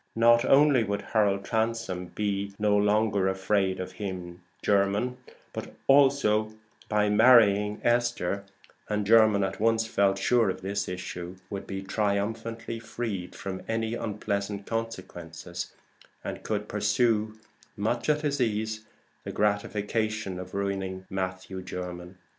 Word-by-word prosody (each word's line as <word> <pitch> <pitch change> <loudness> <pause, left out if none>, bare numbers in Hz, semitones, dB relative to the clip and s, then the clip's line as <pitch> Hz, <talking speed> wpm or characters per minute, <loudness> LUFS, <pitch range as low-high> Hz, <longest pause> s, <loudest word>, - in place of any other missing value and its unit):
Not 120 +1 +5
only 140 -2 +5
would 100 -1 -2
Harold 100 -3 +1
Transome 110 -5 -1
be 100 0 -2
no 105 -1 +2
longer 105 -1 +2
afraid 95 0 +1
of 95 - -5
him, 90 -3 -6 1.1
but - - -7
also, 135 -6 +4 0.3
by 105 -1 +2
marrying 105 -2 +5
Esther 120 -5 +1 0.5
(and 105 -1 0
Jermyn 110 -2 +5
at 95 0 -3
once 115 +1 +2
felt 100 -3 +2
sure 110 +2 +3
of 95 - -4
this 100 +1 -2
issue), 90 0 -6 0.2
would 100 -1 -5
be 95 0 -4
triumphantly 110 +3 -2
freed 115 -5 -5
from 95 -1 -5
any 115 0 -1
unpleasant 100 -2 -3
consequences, 90 -6 -5 0.5
and - - -5
could 105 -1 -2
pursue 110 +1 +1 0.4
much 115 +6 -1
at 150 0 +3
his 145 -3 -1
ease 110 -1 -1 0.4
the - - -5
gratification 105 -1 -1
of 95 +1 -8
ruining 95 -1 -2
Matthew 95 0 -4
Jermyn. 90 0 -7
105 Hz, 125 wpm, -28 LUFS, 95-115 Hz, 1.1 s, Not